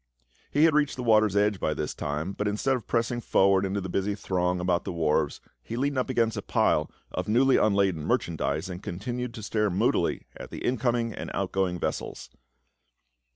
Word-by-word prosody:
He 145 Hz, -, +2 dB
had 165 Hz, -1 st, +6 dB
reached 150 Hz, -1 st, +2 dB
the 125 Hz, -, -5 dB
water's 110 Hz, -3 st, +4 dB
edge 105 Hz, -1 st, +2 dB
by 75 Hz, -, 0 dB
this 75 Hz, -, -3 dB
time, 75 Hz, +6 st, -3 dB
but 105 Hz, +1 st, -2 dB
instead 105 Hz, +6 st, +1 dB
of 120 Hz, -4 st, -6 dB
pressing 120 Hz, +1 st, 0 dB
forward 95 Hz, -3 st, +3 dB
into 100 Hz, +1 st, -1 dB
the 95 Hz, -, -4 dB
busy 95 Hz, +3 st, -1 dB
throng 90 Hz, -2 st, -1 dB
about 90 Hz, -1 st, +1 dB
the -, -, -4 dB
wharves 80 Hz, -3 st, 0 dB, 0.2 s
he 115 Hz, -, -6 dB
leaned 140 Hz, +1 st, 0 dB
up 130 Hz, -, -1 dB
against 115 Hz, -3 st, +1 dB
a -, -, -3 dB
pile 75 Hz, -, +1 dB, 0.2 s
of 90 Hz, -, -3 dB
newly 130 Hz, +5 st, +4 dB
unladen 100 Hz, -6 st, +2 dB
merchandise 80 Hz, +2 st, -1 dB
and 90 Hz, -1 st, -7 dB
continued 120 Hz, +7 st, -4 dB
to 110 Hz, -, -8 dB
stare 105 Hz, +1 st, 0 dB
moodily 90 Hz, -, +1 dB
at -, -, -9 dB
the -, -, -6 dB
incoming 120 Hz, -2 st, 0 dB
and -, -, -6 dB
outgoing 95 Hz, -2 st, 0 dB
vessels. -, -, -4 dB
100 Hz, 190 wpm, -27 LUFS, 90-120 Hz, 0.2 s, had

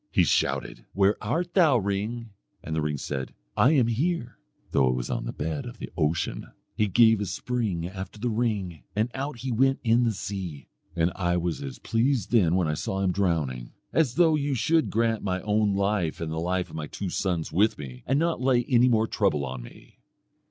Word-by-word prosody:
He -, -, +4 dB
shouted, -, -, 0 dB
'Where 100 Hz, +1 st, +3 dB
art 170 Hz, +11 st, -1 dB
thou, 160 Hz, -9 st, +5 dB
ring?' 105 Hz, +3 st, -2 dB, 0.3 s
And 80 Hz, -, -4 dB
the 80 Hz, -, 0 dB
ring 75 Hz, -1 st, -1 dB
said, 65 Hz, -1 st, -5 dB, 0.2 s
'I 130 Hz, -, +5 dB
am 130 Hz, -6 st, +4 dB
here,' 125 Hz, +1 st, -1 dB, 0.3 s
though 65 Hz, -2 st, +3 dB
it 65 Hz, -, +1 dB
was -, -, -3 dB
on -, -, -2 dB
the -, -, -3 dB
bed 80 Hz, +7 st, -4 dB
of 120 Hz, 0 st, -9 dB
the -, -, -7 dB
ocean. 80 Hz, -1 st, -1 dB, 0.3 s
He 105 Hz, -, +2 dB
gave 110 Hz, +1 st, +5 dB
a 100 Hz, -, -2 dB
spring 100 Hz, -4 st, -2 dB
after 95 Hz, +2 st, -7 dB
the 120 Hz, +2 st, -1 dB
ring, 105 Hz, -, -1 dB
and 110 Hz, +3 st, 0 dB
out 135 Hz, 0 st, -4 dB
he 130 Hz, 0 st, -3 dB
went 135 Hz, +3 st, +2 dB
in 120 Hz, +1 st, +4 dB
the 115 Hz, -, +2 dB
sea. 95 Hz, -7 st, -6 dB, 0.3 s
And 85 Hz, 0 st, +2 dB
I 90 Hz, -2 st, 0 dB
was 85 Hz, -1 st, -2 dB
as 70 Hz, -2 st, -6 dB
pleased 115 Hz, -2 st, 0 dB
then 90 Hz, -8 st, +4 dB
when 90 Hz, -3 st, +2 dB
I 75 Hz, -, 0 dB
saw 95 Hz, +5 st, -2 dB
him 95 Hz, -2 st, +2 dB
drowning, 80 Hz, -11 st, -1 dB, 0.2 s
as 140 Hz, -7 st, +2 dB
though 165 Hz, -2 st, +5 dB
you 145 Hz, -2 st, 0 dB
should 160 Hz, +6 st, +2 dB
grant 115 Hz, 0 st, +1 dB
my 90 Hz, -2 st, -1 dB
own 105 Hz, -1 st, +1 dB
life 100 Hz, -4 st, 0 dB
and 80 Hz, -1 st, -3 dB
the 80 Hz, -, -2 dB
life 90 Hz, +2 st, -1 dB
of -, -, -9 dB
my 75 Hz, -1 st, -4 dB
two 95 Hz, +2 st, -5 dB
sons 90 Hz, -4 st, -1 dB
with 105 Hz, +5 st, +3 dB
me, 65 Hz, -4 st, -8 dB
and 135 Hz, -, +2 dB
not 165 Hz, -3 st, 0 dB
lay 125 Hz, -2 st, +3 dB
any 125 Hz, 0 st, +4 dB
more 110 Hz, -2 st, +3 dB
trouble 95 Hz, -11 st, 0 dB
on 65 Hz, -1 st, -5 dB
me. -, -, -15 dB
100 Hz, 210 wpm, -26 LUFS, 85-120 Hz, 0.3 s, thou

